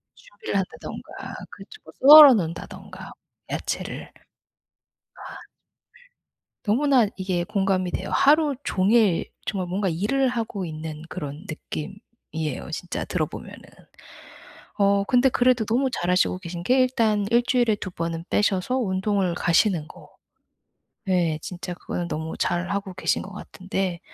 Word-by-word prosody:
준비를 - - -8
한다든가 190 -2 -6
그쵸. 435 - -13 0.2
썰어 290 0 +11
놓는다든가, 170 -6 -5 0.4
야채를. - - -4 1.2
아. - - -10 1.3
너무나 250 +1 +3
이게 185 -2 -1
공감이 190 -2 0
돼요. - - -4
하루 295 0 +4
종일 200 -1 +2 0.2
정말 185 -3 -2
뭔가 190 +2 -1
일을 215 +11 +1
하고 225 -6 -3
있는 155 -1 -7
그런 150 0 -7
느낌이에요, 160 - -7
진짜 175 +2 -4
들어 - - -1
보면은. - - -10 1.2
어. 200 0 +3
근데 250 +5 +3
그래도 250 -2 +2
너무 255 +5 +1
잘 180 -7 -2
하시고 180 0 +2
계신 175 -2 -7
게 255 +7 +3
일단 225 -5 +2
1 235 +1 +4
주일에 245 -3 +2
2 190 - -6
번은 165 -1 -4
빼셔서 210 +4 +1
운동을 190 -4 0
가시는 170 -1 +2
거. - - -15 1.0
네. 175 -5 +1
진짜 180 +1 -6
그거는 175 0 -5
너무 160 +1 -4
잘 175 +1 -1
하고 200 -2 -3
계신 - - 0
거 195 - -10
같은데 190 -3 -4
195 Hz, 265 characters per minute, -24 LUFS, 175-235 Hz, 1.3 s, 썰어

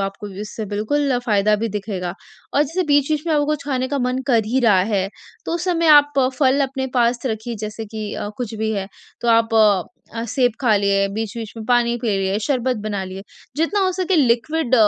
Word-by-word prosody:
आपको 195 +2 -4
इससे 215 +1 -5
बिल्कुल 245 +6 0
फ़ायदा 210 -2 +3
भी 225 +2 -2
दिखेगा 195 -4 -4 0.4
और 290 - +5
जैसे 330 +6 -1
बीच-बीच 290 +1 +2
में 325 - +1
आपको 290 -1 +2
कुछ 300 -1 -2
खाने 260 -2 -1
का 280 0 -1
मन 250 +1 0
कर 230 -5 +3
ही 260 +4 +1
रहा 205 -6 +4
है, 195 -2 0 0.4
तो - - -2
उस 345 0 -2
समय 335 -3 +1
आप 290 -1 +7 0.3
फल 275 0 +3
अपने 265 0 -2
पास 240 0 +2
रखिए, 225 0 -3
जैसे 215 +1 -5
कि 215 -1 -6
अ, - - -4
कुछ 235 -3 -4
भी 220 0 -1
है, 195 -2 -2 0.3
तो 240 - -1
आप 230 0 +3 0.6
अ, 230 0 -3
सेब 250 +1 +2
खा 230 -5 +3
लें, 200 0 +1
बीच-बीच 220 0 -4
में 220 - -6
पानी 240 0 +2
पी 235 - -1
लिए, 195 +1 0
शरबत 255 -2 0
बना 200 -2 -2
लिए, 190 +1 -8 0.3
जितना 330 +6 +1
हो 370 - +1
सके 370 0 0
लिक्विड 260 +1 +2
235 Hz, 205 wpm, -20 LUFS, 210-280 Hz, 0.6 s, आप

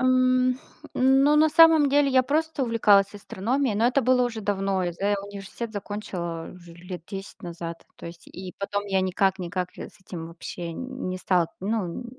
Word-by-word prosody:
М, 255 0 +3 0.4
ну, 270 +3 +4
на 310 +1 +5
самом 320 -1 +6
деле 285 0 +3
я 260 -1 +5
просто 310 +2 -1
увлеклась 210 -4 +3
астрономией. 220 +4 -1
Но 225 +3 +3
это 255 +3 +3
было 250 +1 +3
уже 230 -2 -3
давно. 195 -2 -1
Я 175 - -2
за 200 +4 0
университет 205 +3 -7
закончила 190 -5 -5
уже 175 -2 -14
лет 180 +1 -8
10 195 +2 -8
назад. 170 -1 -7
То - - -10
есть, 170 0 -11
и 185 -1 -9
потом 205 +1 -2
я 195 -1 +1
никак-никак, 185 -1 0
э, - - -6
с - - -21
этим 170 -3 -8
вообще 170 0 -7
н 255 +2 -6
не 185 0 -3
стал 180 -2 +2
Н 190 - -4
ну, 215 0 -2
205 Hz, 180 wpm, -25 LUFS, 185-255 Hz, 0.4 s, самом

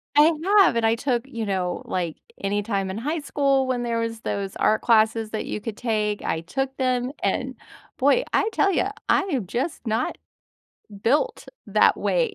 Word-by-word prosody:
I 300 +3 +7 0.3
have, 360 - +4
and 230 -1 +1
I 225 +1 +3
took, 240 -1 -1
you 230 -4 -4
know 185 -3 -2
like, 170 -4 -3 0.3
anytime 200 -1 -1
in 190 - -4
high 300 +8 -2
school 275 -2 +1
when 245 -1 -1
there 230 -1 -1
was 230 -1 -3
those 195 -1 -3
art 215 - +2
classes 220 -1 +3
that 215 - -3
you - - -4
could 215 -1 -6
take, 215 -3 -1
I 160 - -1
took 270 +10 -3
them, 255 -1 0
and - - -1 0.4
boy, 285 - +3
I 430 - +3
tell 395 - +3
you, - - +1 0.2
I - - +5
am 275 - -2
just 265 - -3
not 225 +3 -1 0.8
built 295 - +1 0.2
that - - +4
way. 485 -4 +1
230 Hz, 180 wpm, -24 LUFS, 215-275 Hz, 0.8 s, I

